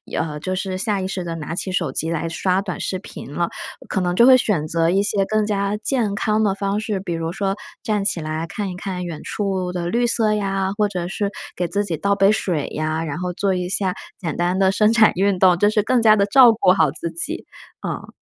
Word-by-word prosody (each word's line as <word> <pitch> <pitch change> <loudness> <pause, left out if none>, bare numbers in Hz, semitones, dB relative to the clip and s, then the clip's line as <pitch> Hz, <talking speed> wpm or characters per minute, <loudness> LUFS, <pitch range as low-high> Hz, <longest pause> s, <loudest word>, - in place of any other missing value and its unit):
呃 150 -2 -2
就 185 +5 -3
是 185 0 -3
下 200 0 -1
意 185 - -2
识 190 -1 -4
地 170 -1 -4
拿 165 0 -5
起 185 - -3
手 180 -7 -1
机 160 +4 -2
来 165 0 -2
刷 185 +3 0
短 195 -3 -5
视 185 - -3
频 145 -6 -10
了， 170 +2 0 0.4
可 195 - 0
能 180 -1 0
就 235 +6 +6
会 260 -1 +9
选 195 -11 0
择 165 +1 +1
一 190 +3 +3
些 200 -1 0
更 215 +1 +1
加 200 -1 0
健 220 -2 -1
康 215 +1 +1
的 200 -2 +2
方 200 +1 -1
式， 215 -2 -2
比 180 -2 -4
如 165 0 -3
说 195 +1 -1 0.3
站 210 -2 -1
起 175 - 0
来 155 +1 -3
看 200 +4 -4
一 180 - -6
看 180 -1 -4
远 170 -3 -6
处 190 -3 -2
的 175 -1 -3
绿 240 +5 +1
色 225 -2 +2
呀， 195 -2 -1
或 210 - +3
者 180 -3 -4
是 200 +2 -2 0.2
给 175 - -1
自 200 +4 -1
己 170 -6 -3
倒 200 +6 +1
杯 195 0 +4
水 175 -8 -1
呀， 155 +1 -2
然 150 -2 -4
后 180 0 -3
做 190 +2 0
一 180 0 -2
下 190 -1 0 0.3
简 170 -6 -4
单 175 +2 0
的 190 -1 +4
伸 210 +2 +3
展 225 -2 +6
运 195 0 +1
动， 180 -2 +5
这 205 +3 +4
是 210 0 +2
更 240 +4 +2
加 215 -1 +6
地 200 -1 +3
照 245 +2 +7
顾 220 -4 +3
好 160 -6 +3
自 170 +2 -5
己。 175 - -5 0.4
嗯。 - - -5
190 Hz, 265 characters per minute, -21 LUFS, 175-205 Hz, 0.4 s, 会